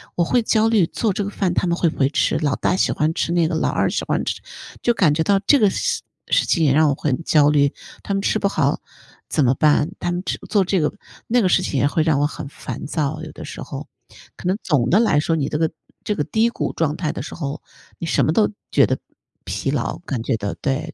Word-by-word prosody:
我 175 - +2
会 240 +8 +2
焦 220 0 +3
虑 215 -6 +4
做 220 - -1
这 200 - -2
个 - - -3
饭， 195 -3 -1
他 180 - 0
们 170 - +1
会 170 - +2
不 - - -9
会 135 - +4
吃， 150 - +1
老 145 -4 0
大 - - 0
喜 - - +2
欢 155 +1 0
吃 170 - -1
那 170 -1 +3
个 165 - -2
老 160 - +1
二 - - +1
喜 - - -2
欢 - - 0
吃 - - -3 0.4
就 240 - +2
感 185 -9 +3
觉 160 - 0
到 200 +3 +3
这 245 +8 +4
个 210 -3 +5
事 485 - -1 0.3
事 - - +3
情 165 -3 +2
也 140 - +4
让 155 +1 +4
我 140 - +1
很 145 +2 -2
焦 150 -2 +4
虑， 140 -1 +3 0.3
他 200 - -2
们 195 - 0
吃 215 - +1
不 200 - +1
好 - - 0 0.5
怎 150 - +2
么 125 - +4
办？ 150 +2 +3
他 175 - -1
们 175 0 -2
只 - - -2
做 200 -3 +3
这 185 +1 +1
个 150 - +1 0.4
那 245 +1 +3
个 195 - +3
事 185 - +3
情 140 - -1
也 140 - +3
会 155 +2 +1
让 155 -3 +2
我 145 - +3
很 150 - -7
烦 - - -7
躁， 150 -3 -2
有 - - -7
的 - - -9
时 - - -8
候， - - -7 0.5
可 - - -12
能 185 +2 +1
总 130 -8 +1
的 195 - +5
来 195 -10 +3
说， 165 +1 0
你 140 - -1
这 150 - -1
个 160 0 +1 0.3
这 210 - -1
个 150 - 0
低 225 +1 +2
谷 - - -3
状 155 -1 -1
态 155 -4 -2
的 - - -5
时 - - -7
候， 140 -3 -4 0.4
你 - - -4
什 140 -4 +2
么 155 - +1
都 215 +3 +3 0.2
觉 - - +5
得 - - -1 0.5
疲 - - -2
劳， - - -2
感 135 -9 -4
觉 120 - 0
到， 100 -1 -3
对。 135 +1 -3
165 Hz, 285 characters per minute, -21 LUFS, 145-195 Hz, 0.5 s, 个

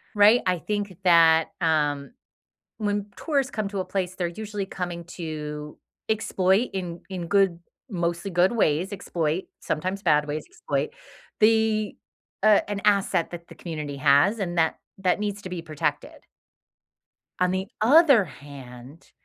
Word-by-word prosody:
right? 210 +4 +6
I 180 -2 +1
think 205 0 -3
that, 165 -2 +5
um, 150 -4 +1 0.7
when 205 -2 -1
tourists 280 -4 0
come 215 -6 -2
to 200 0 -5
a - - -2
place, 185 -2 -3
they're 180 -2 -1
usually 205 +2 -5
coming 175 -2 -5
to 150 -3 -6 0.3
exploit 205 0 +1
in 180 -3 -4
in 185 -3 -5
good, 195 -3 +2 0.3
mostly 175 -2 -2
good 175 +4 +3
ways, 185 -3 +1
exploit 170 -3 -2 0.2
sometimes 185 +5 -3
bad 150 -4 +3
ways, 150 +1 -4
exploit, 140 +1 -3 0.5
the 220 -1 +3 0.5
a 210 -1 +4
an 200 -1 -2
asset 200 -4 +2
that 170 -1 -8
the - - -12
community 150 -4 -6
has 145 +9 +4
and 175 -3 -2
that 160 0 +2 0.2
that 185 0 +1
needs 205 -1 -2
to 185 - -6
be 180 -2 -5
protected. 150 -2 -3 1.1
On 180 0 +2
the 190 +1 -2
other 275 - +6
hand, 135 0 -12
180 Hz, 145 wpm, -25 LUFS, 160-205 Hz, 1.1 s, right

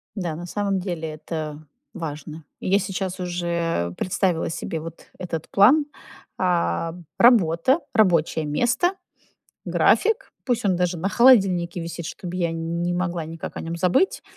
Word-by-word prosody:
Да, 175 -6 -3
на 175 +2 -7
самом 200 +1 -1
деле 175 -4 -4
это 155 0 -6 0.3
важно. 155 -3 -7 0.2
И - - -4
я 200 +2 +4
сейчас 190 -1 -3
уже 170 - -2
представила 180 -2 0
себе 165 0 -4
вот 165 +1 -10
этот 165 -3 -5
план. 260 +10 +5 0.5
А, 165 - 0 0.2
работа, 230 - +4
рабочее 170 -8 +3
место, 245 - +1 0.7
график, 450 +3 +2
пусть 245 -4 0
он 190 -3 +2
даже 180 0 0
на 185 +4 -1
холодильнике 195 -8 +4
висит, 170 0 -6
чтоб 175 +1 -7
я 170 -2 0
не 170 +2 -2
могла 175 -2 -2
никак 165 0 -7
о - - -3
нём 165 +1 -4
забыть. 180 - +2
175 Hz, 140 wpm, -23 LUFS, 165-195 Hz, 0.7 s, план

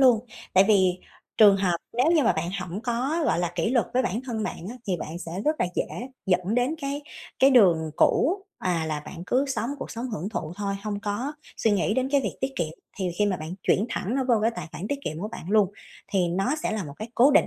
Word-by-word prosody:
luôn. 250 -3 +5 0.3
Tại 190 +1 +7
vì 185 -3 +4 0.4
trường 205 -2 +8
hợp 185 -3 +1 0.2
nếu 250 +4 +3
như 315 -4 +4
mà - - +4
bạn 170 +2 -2
hổng 180 +3 -5
có, 260 +8 0
gọi - - +2
là, 175 0 -1
kỷ 175 +6 0
luật 245 -3 +2
với 255 - +4
bản 225 0 -1
thân 225 -4 -3
bạn 175 - -4
á, 250 - -8
thì 185 -2 +1
bạn 160 +2 -6
sẽ 165 -2 -7
rất 305 +1 +2
là - - +2
dễ - - +1 0.4
dẫn 185 +3 +1
đến 250 +5 +2
cái 280 +1 -3 0.4
cái 270 - +6
đường 175 - +5
cũ, 385 +6 +3
à, 170 -3 0
là 150 -1 -2
bạn 170 +3 -9
cứ 260 +6 +2
sống 260 -2 -2
cuộc - - -6
sống 240 +2 -4
hưởng 195 -1 -3
thụ 170 -6 -4
thôi, 200 -1 -2
hông 205 -1 -3
có 220 +7 -2 0.2
suy 225 - +2
nghĩ 205 +1 +2
đến 260 0 +1
cái 280 -1 +4
việc 205 - -3
tiết 265 +1 -1
kiệm, 170 -3 0 0.3
thì 185 -2 0
khi 210 - +4
mà 190 -3 +1
bạn 160 +3 -6
chuyển 210 +5 +2
thẳng 225 +3 -2
nó 270 -1 +1
vô 240 - +6
cái 225 - +3
tài 165 - -5
khoản 195 - -5
tiết 285 - -1
kiệm 155 +1 -3
của 210 - -3
bạn 195 -5 -8
luôn, 205 -2 +4 0.4
thì 180 -3 +2
nó 195 - 0
sẽ - - 0
là 210 -5 -2
một 140 -1 -8
cái 215 +2 -6
cố 260 +5 +6
định, - - +5
210 Hz, 260 wpm, -26 LUFS, 180-255 Hz, 0.4 s, trường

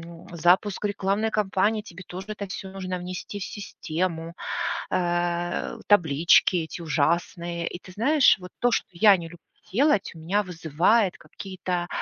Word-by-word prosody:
м, 170 0 -12
запуск 180 +5 +2
рекламной 205 +1 0
кампании, 210 +1 +1
тебе 185 -3 -11
тоже 185 +2 -7
это 210 -1 -5
всё 190 +1 -6
нужно 185 -1 -4
внести 180 +3 -6
в 195 - -4
систему. 170 -4 -4 0.6
Э, 175 +3 -1
таблички 170 -1 +4
эти 165 +1 -4
ужасные. 170 +2 -1
И 175 - -5
ты 185 - -12
знаешь, 265 +9 +4
вот 180 0 -10
то, 245 - +3
что - - 0
я 200 +3 +6
не 170 - -7
люблю 175 +1 -12 0.4
делать, 265 -3 +3
у - - -11
меня 190 +6 0
вызывает 180 +4 +1
какие-то 180 +1 -5
180 Hz, 150 wpm, -25 LUFS, 170-205 Hz, 0.6 s, я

